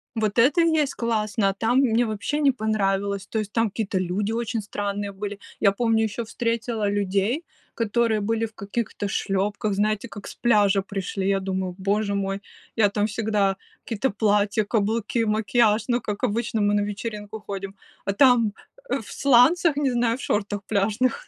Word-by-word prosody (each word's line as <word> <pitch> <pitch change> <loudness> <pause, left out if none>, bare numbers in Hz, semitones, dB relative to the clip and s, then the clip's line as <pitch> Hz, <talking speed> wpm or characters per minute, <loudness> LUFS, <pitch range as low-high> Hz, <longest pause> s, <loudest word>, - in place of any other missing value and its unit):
Вот 215 0 0
это 270 +8 +5
и 335 - +4
есть 295 -3 +1
классно, 215 -3 0
а - - -1
там 230 +5 +1
мне 240 -3 +3
вообще 220 +7 -2
не 285 -2 +4
понравилось. 200 -4 -1
То 220 - -2
есть 210 -1 -4
там 225 0 +2
какие-то 200 -2 -2
люди 190 +4 -1
очень 230 -1 -2
странные 205 0 -3
были. 200 +1 -6 0.2
Я 200 - +5
помню, 225 +1 +1
еще 220 +2 -3
встретила 230 -1 -1
людей, 205 - 0 0.3
которые 230 0 +1
были 225 +2 0
в 220 - -10
каких-то 205 0 -3
шлепках, 200 +2 -1
знаете, 210 +1 0
как 205 - -9
с - - -9
пляжа 205 -4 +3
пришли. 195 0 -3
Я 195 0 +2
думаю: 190 -1 -3
боже 200 +1 0
мой, 195 0 -2 0.3
я 215 -3 +4
там 205 +1 0
всегда 210 -3 0 0.3
какие-то 235 +3 -1
платья, 210 0 +2
каблуки, 225 +2 0
макияж, 215 +1 +2
ну, 240 -1 +1
как 205 +1 -5
обычно 225 -1 0
мы 205 0 +2
на 205 - +2
вечеринку 210 +1 -5
ходим. 195 -1 -6 0.3
А 195 - 0
там, 235 -2 +4 0.4
э, - - 0
в - - -12
сланцах, 280 +5 +4
не 285 -3 +1
знаю, 235 -1 +1
в - - -10
шортах 205 -3 -1
пляжных. 220 - 0
210 Hz, 175 wpm, -24 LUFS, 200-230 Hz, 0.4 s, это